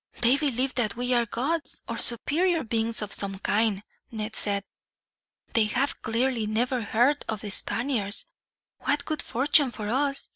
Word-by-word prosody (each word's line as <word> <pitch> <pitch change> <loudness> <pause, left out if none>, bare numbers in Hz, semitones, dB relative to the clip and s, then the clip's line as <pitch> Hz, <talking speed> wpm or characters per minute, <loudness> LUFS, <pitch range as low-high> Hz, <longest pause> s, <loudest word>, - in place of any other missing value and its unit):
"They 240 +2 +5
believe 270 -3 0
that 230 -5 0
we 245 +1 0
are 240 -1 +2
gods, 285 +9 -2
or 230 -1 -4
superior 320 +9 +1
beings 225 -1 -1
of 210 - -6
some 195 -1 -1
kind," 205 0 +1 0.3
Ned 220 -1 -5
said. 200 -1 +1 0.9
"They 225 -2 +4
have 260 +6 -1
clearly 230 0 0
never 245 +4 0
heard 240 +7 +2
of 215 -2 -2
the 205 - -5
Spaniards. 225 -1 +1 0.5
What 285 0 0
good 310 -2 -2
fortune 280 +3 +4
for 215 -3 -5
us! 275 +3 -1
235 Hz, 155 wpm, -26 LUFS, 215-270 Hz, 0.9 s, They